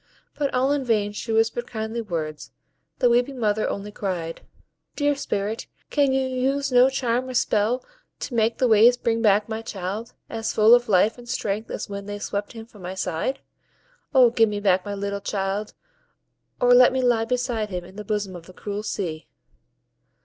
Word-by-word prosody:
But 285 -2 -1
all 260 +2 +2
in 290 -1 +1
vain 215 -4 +1
she 210 +2 -5
whispered 225 +2 +1
kindly 220 +1 -4
words; 160 -7 -4 0.5
the 245 - +3
weeping 245 +3 +2
mother 215 -1 +1
only 200 +1 -5
cried,— 175 -5 -4 0.5
"Dear 290 0 +2
Spirit, 215 -4 -3 0.2
can 285 -2 +3
you 265 0 +1
use 270 +2 0
no 250 +1 +6
charm 255 -1 -1
or 255 - -5
spell 240 0 +1 0.4
to - - -5
make 225 0 +1
the 255 - +2
waves 230 +2 +6
bring 230 -2 0
back 210 -1 +3
my 220 0 -4
child, 205 +2 -5
as 225 -1 -3
full 220 +2 +7
of 245 -1 +4
life 210 +5 +3
and 240 0 -12
strength 215 -3 -2
as - - -4
when 200 -1 -6
they 205 0 -4
swept 205 +1 -4
him 225 -1 -9
from 215 -3 -17
my 180 +1 -6
side? 185 +8 -2 0.7
O 255 -4 +6
give 225 -2 +3
me 205 -1 -3
back 190 -2 +2
my 205 +1 -4
little 200 0 -3
child, 200 +1 -3 0.8
or 245 0 +5
let 250 0 +7
me 260 0 0
lie 235 -2 +3
beside 240 -3 -1
him 180 -2 -5
in 190 +2 -14
the 210 - -6
bosom 205 -2 -2
of 170 -1 -11
the 185 - -13
cruel 205 +2 -5
sea." 170 -7 -4
220 Hz, 190 wpm, -24 LUFS, 200-245 Hz, 0.8 s, full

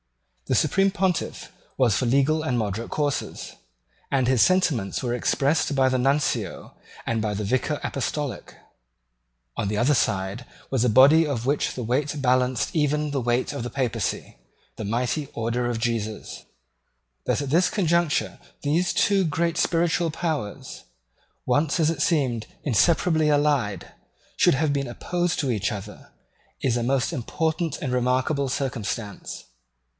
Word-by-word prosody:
The - - +1
Supreme 195 0 +3
Pontiff 190 -3 -2 0.3
was 120 -6 +3
for 130 - 0
legal 140 +5 +2
and 130 -6 0
moderate 110 +1 -2
courses; 145 -2 -3 0.6
and 130 -3 +2
his 130 -3 +3
sentiments 155 - +2
were 120 -2 -1
expressed 140 +4 +1
by 135 -1 +4
the 130 0 0
Nuncio 140 +3 -1 0.3
and 115 -1 -1
by 105 -1 -1
the 105 +1 -3
Vicar 130 +7 0
Apostolic. 140 0 -3 1.0
On - - -2
the 105 - -1
other 125 +7 +3
side 100 -2 0 0.3
was 130 -3 +1
a 125 - +3
body 140 +8 +6
of 130 -6 -3
which 145 +3 0
the 125 - -4
weight 140 +5 -1
balanced 125 0 +1
even 150 -1 +1
the 140 -2 -1
weight 120 +4 0
of 140 - -4
the 120 - -4
Papacy, 120 - -2 0.4
the - - -6
mighty 125 +7 -1
Order 120 +2 -1
of 115 -2 -2
Jesus. 110 -2 -3 0.8
That - - 0
at 135 - -5
this 175 +4 +4
conjuncture 170 -5 0 0.2
these 165 +5 +1
two 200 -2 +3
great 170 +1 0
spiritual 170 0 +1
powers, 155 -10 -4 0.6
once, 150 +3 +1
as 160 -1 +3
it 155 -3 -4
seemed, 130 -9 +1 0.2
inseparably 155 - +3
allied, 145 -8 +1 0.4
should - - +4
have 145 +1 +1
been 140 -2 -1
opposed 175 +8 -2
to 135 -4 0
each 105 -2 -1
other, 100 -3 -8 0.5
is 125 -3 0
a 120 - 0
most 130 0 0
important 160 +5 -2
and 130 -4 -2
remarkable 130 +3 +1
circumstance. 115 -5 -4
135 Hz, 150 wpm, -24 LUFS, 120-155 Hz, 1.0 s, body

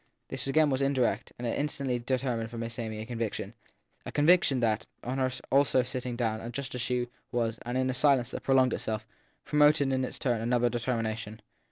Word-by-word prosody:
This 135 0 -2
again 150 +1 +4
was 130 0 0
indirect, 125 -5 +1
and 120 - -5
it 115 - -1
instantly 140 -4 -1
determined 120 -2 -1
for 120 - -8
Miss 115 0 -4
Amy 110 -2 -4
a - - -5
conviction 115 -2 -3 0.5
a - - -6
conviction 150 -3 +4
that, 110 -2 0 0.2
on 130 +2 -2
her 130 -1 +2 0.2
also 135 -2 +4
sitting 125 -1 -4
down 115 -1 -2
just 140 +2 -5
as 125 - -3
she 125 0 0 0.2
was 115 -2 -1
and 120 +1 -3
in 130 0 +1
a 130 - 0
silence 130 -2 +3
that - - -5
prolonged 130 -2 +3
itself, 110 0 -2 0.4
promoted 150 -2 +4
in 130 0 +1
its 130 - -3
turn 120 -4 0
another 120 +1 +2
determination. 115 -3 -2
125 Hz, 195 wpm, -29 LUFS, 115-135 Hz, 0.5 s, again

